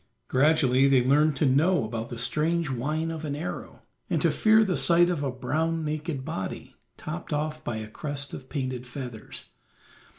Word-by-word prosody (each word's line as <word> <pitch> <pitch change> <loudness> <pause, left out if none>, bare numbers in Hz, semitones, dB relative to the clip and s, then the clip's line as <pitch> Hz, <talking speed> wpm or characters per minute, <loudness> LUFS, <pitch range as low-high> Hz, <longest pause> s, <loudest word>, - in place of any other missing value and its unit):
Gradually 135 -1 +4
they 135 -2 +4
learned 150 +3 +4
to 140 - +1
know 150 +7 +3
about 110 +1 -4
the 120 - -6
strange 155 +6 0
whine 155 +6 -1
of 160 -1 -6
an 145 -2 -3
arrow, 160 +4 -6 0.3
and - - +1
to - - +4
fear 220 0 +5
the 190 -4 0
sight 175 +1 +5
of 165 -5 -2
a 140 - -1
brown 155 +6 -1
naked 150 -2 -3
body, 95 -12 -5 0.2
topped 160 +3 -6
off 155 +1 -2
by 120 - -3
a 110 -1 -5
crest 140 +5 -4
of 130 - -8
painted 130 -3 -3
feathers. 120 -3 -8
145 Hz, 175 wpm, -27 LUFS, 130-160 Hz, 0.3 s, fear